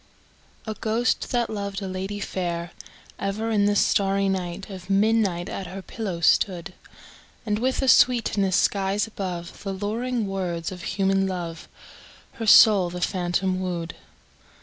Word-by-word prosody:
A 220 - -3
ghost, 225 +3 -1
that 240 -2 +1
loved 200 -2 -4
a 195 - -5
lady 190 +2 -4
fair, 175 -3 -3 0.5
Ever 215 +3 -2
in 205 -2 +3
the 205 0 +2
starry 195 0 +2
air 175 -2 -4
Of 190 -2 -10
midnight 195 -3 +2
at 190 - -5
her 190 +2 -8
pillow 190 -7 -5
stood; 175 0 +2 0.7
And, 210 -1 0
with 260 +3 0
a - - 0
sweetness 220 -7 +4
skies 200 +1 +1
above 180 -5 -6
The 195 -1 -4
luring 225 +4 -2
words 180 -4 -3
of 180 -1 -8
human 195 +1 +1
love, 170 -3 -5 0.6
Her 225 - -6
soul 205 -4 +7
the 180 +1 -6
phantom 185 +1 0
wooed. 175 -3 -3
195 Hz, 145 wpm, -24 LUFS, 180-210 Hz, 0.7 s, soul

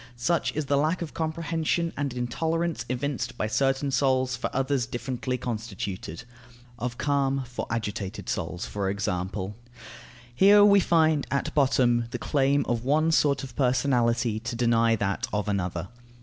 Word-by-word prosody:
Such 165 +8 +1
is 155 -1 -1
the 140 +1 +1
lack 160 +4 0
of 160 - -8
comprehension 165 +1 -1
and 145 -2 -2
intolerance 160 +4 -2
evinced 125 -2 -3
by - - -1
certain 135 +5 +1
souls 130 -1 +2
for 120 - -3
others 135 -2 0
differently 125 +1 -3
constituted 105 -7 -5 0.6
(of 125 0 -3
calm 140 -2 +1
for 120 0 -5
agitated 105 -4 -4
souls, 85 +2 -3
for 100 -2 -2
example). 95 0 -3 0.8
Here 205 +8 +7
we 200 -1 +6
find 160 -5 +2
at 140 - -1
bottom 125 -4 +3
the 120 - -4
claim 140 +3 +1
of 120 -1 -1
one 155 +5 +2
sort 145 -3 +2
of 130 -3 -9
personality 125 -3 +1
to 120 +2 -5
deny 115 -1 +3
that 100 +3 -1
of 105 0 -1
another. 90 -3 -2
125 Hz, 150 wpm, -26 LUFS, 115-145 Hz, 0.8 s, Here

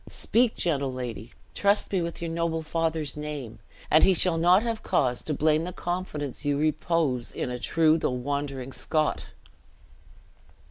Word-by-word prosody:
Speak, 235 0 +1
gentle 140 -6 0
lady! 120 -3 -6 0.2
trust 200 +1 +2
me 190 -3 +1
with 170 0 -4
your 165 - -3
noble 165 -1 -1
father's 160 -3 -2
name, 145 -7 -6 0.3
and 155 - +6
he 190 - +5
shall 170 -1 +4
not 180 +5 +5
have 230 -2 -2
cause 125 -3 0
to - - -4
blame 155 +2 +2
the 180 - -4
confidence 175 -7 -4
you 145 -1 0
repose 155 -4 0
in 125 - -4
a 125 - -4
true 160 +4 +3
though - - 0
wandering 135 0 -3
Scot!" 155 -1 -1
155 Hz, 155 wpm, -26 LUFS, 135-170 Hz, 0.3 s, and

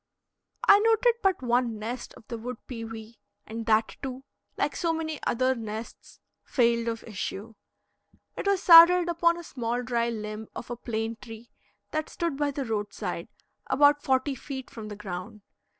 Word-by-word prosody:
I 405 - +9
noted 455 +2 +4
but 380 -8 +1
one 240 -2 +1
nest 235 +4 -6
of 220 - -17
the 235 -2 -5
wood 250 +1 -5
pewee, 225 -2 -8 0.3
and 225 +1 -6
that, 220 0 +2
too, 265 -1 -5 0.3
like - - 0
so 335 -2 0
many 315 -2 -3
other 255 +2 +2
nests, 220 -1 -8 0.2
failed 235 -2 +2
of 230 -1 -3
issue. 210 +1 -5 0.8
It - - -4
was 395 -1 +2
saddled 345 +1 +9
upon 340 0 +2
a 345 - -8
small 245 -4 -3
dry 235 -1 0
limb 215 -1 -5
of 245 - -7
a - - -2
plane 225 -1 -3
tree 225 0 -11 0.4
that 310 0 -2
stood 335 -5 -2
by 290 +1 0
the 280 -1 -3
roadside, 205 -3 -3 0.4
about 290 +2 +4
forty 265 +1 +1
feet 265 0 -7
from 220 -2 -8
the 210 - -7
ground. 200 +1 -7
240 Hz, 165 wpm, -27 LUFS, 225-295 Hz, 0.8 s, I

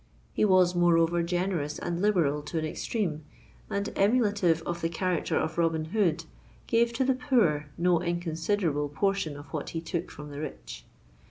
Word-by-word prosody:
He - - +2
was 185 -3 +4
moreover 170 -1 +3
generous 175 -3 -1
and 175 0 -3
liberal 170 -8 +2
to 150 +3 -5
an 155 - 0
extreme, 155 -2 -2 0.5
and, 200 0 -1
emulative 200 -6 +2
of 170 0 -4
the 165 - 0
character 175 0 -1
of 160 +1 -1
Robin 165 -2 +1
Hood, 170 -7 +1 0.4
gave 235 0 +2
to 255 +3 +1
the 265 - +3
poor 230 - +1
no 175 -1 +2
inconsiderable 170 -2 -1
portion 195 -1 -1
of 145 -1 -12
what - - -3
he - - 0
took 165 +1 -4
from 150 -1 -10
the 145 - -7
rich. - - -7
170 Hz, 165 wpm, -28 LUFS, 155-195 Hz, 0.5 s, was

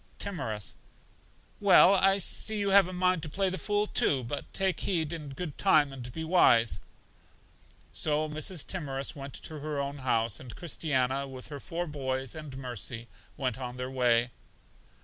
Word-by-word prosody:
Timorous: 120 - -3 0.9
Well, 200 -1 +7
I 195 0 +4
see 215 +3 0
you 200 -1 0
have 195 -2 +7
a - - -6
mind 180 -1 +1
to 155 - -2
play 190 +5 0
the 185 - -3
fool, 205 0 +1
too; 135 -9 +1
but 120 +5 -5
take 190 -1 0
heed 165 -4 0
in 155 -4 -6
good 145 +2 -6
time, 150 -8 +4
and 125 -2 -7
be 160 +6 -5
wise. 140 -9 +4 1.1
So 155 0 +1
Mrs. 155 +3 -2
Timorous 140 -7 -3
went 140 -2 -8
to 155 -1 -7
her 150 0 -3
own 140 0 -3
house; 115 -5 0
and 125 -3 -9
Christiana, 140 -5 -1
with 130 0 -9
her 145 -2 -6
four 170 +5 -4
boys 135 -4 -3
and 150 -4 -8
Mercy, 120 -2 -4 0.3
went 130 -4 -2
on 125 -1 -5
their 125 +1 -4
way. 120 -2 +2
145 Hz, 170 wpm, -29 LUFS, 130-175 Hz, 1.1 s, Well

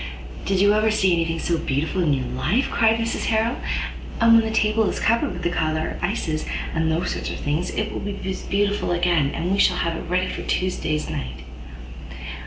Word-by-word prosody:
"Did 195 -1 +1
you 205 +1 +5
ever 215 +1 +3
see 195 -4 +3
any 165 -1 +2
thing 165 0 -2
so 165 0 0
beautiful 155 +7 -1
in 160 -4 +2
your 130 -2 0
life?" 175 - 0
cried 225 -1 +3
Mrs 230 0 -2
Harrel; 225 +2 +1 0.6
"and 230 0 +6
when 230 - +7
the 220 - -2
table 220 0 +2
is - - -3
covered 230 +1 +2
with 180 0 -7
the 175 - +1
coloured 155 -1 -1
ices 170 -5 -1 0.3
and 160 0 +1
those 165 +3 0
sort - - -3
of - - -4
things, 155 +5 -1
it 215 - -2
will - - -4
be 200 0 -5
as 190 - -3
beautiful 200 -2 0
again. 175 0 +1
We 200 - 0
shall 180 - +4
have 170 -1 0
it 165 - -7
ready 180 +1 +2
for - - -4
Tuesday 180 -4 -1
se'nnight. 65 - -5
180 Hz, 205 wpm, -23 LUFS, 160-215 Hz, 0.6 s, when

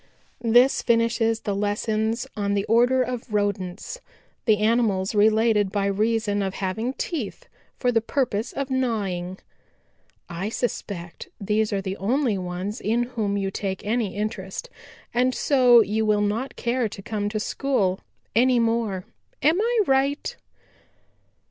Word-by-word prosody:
"This 240 +3 +5
finishes 230 -1 +2
the 205 - -2
lessons 220 +3 -1
on 200 -1 0
the 200 0 0
order 245 +3 +4
of 250 -2 -5
Rodents, 205 - -2 0.4
the 215 -3 +4
animals 210 -3 +1
related 215 -1 +3
by 200 -1 0
reason 210 +1 +1
of 195 -1 -2
having 220 +7 -2
teeth 325 - -4 0.3
for 250 - +1
the 225 -2 +2
purpose 230 -2 -1
of 275 -1 -4
gnawing. 200 -8 -1 0.9
I 175 +5 -4
suspect 200 -7 -4
these 210 +2 0
are 195 -1 -1
the 190 0 -4
only 245 +3 +1
ones 185 +4 -4
in 230 +3 +1
whom 205 -3 -1
you 195 -1 -1
take 195 -1 -4
any 220 -2 -1
interest, 210 - -4 0.4
and 255 +1 +2
so 250 -4 +5
you 220 +1 0
will 210 -1 +2
not 215 +6 -1
care 235 -1 0
to 195 - -9
come 205 -1 -2
to 215 0 -2
school 210 -6 0 0.4
any 250 +2 +4
more. 225 -5 0 0.4
Am 320 +7 +4
I 470 +1 +1
right?" 275 +1 +1
220 Hz, 140 wpm, -24 LUFS, 200-245 Hz, 0.9 s, This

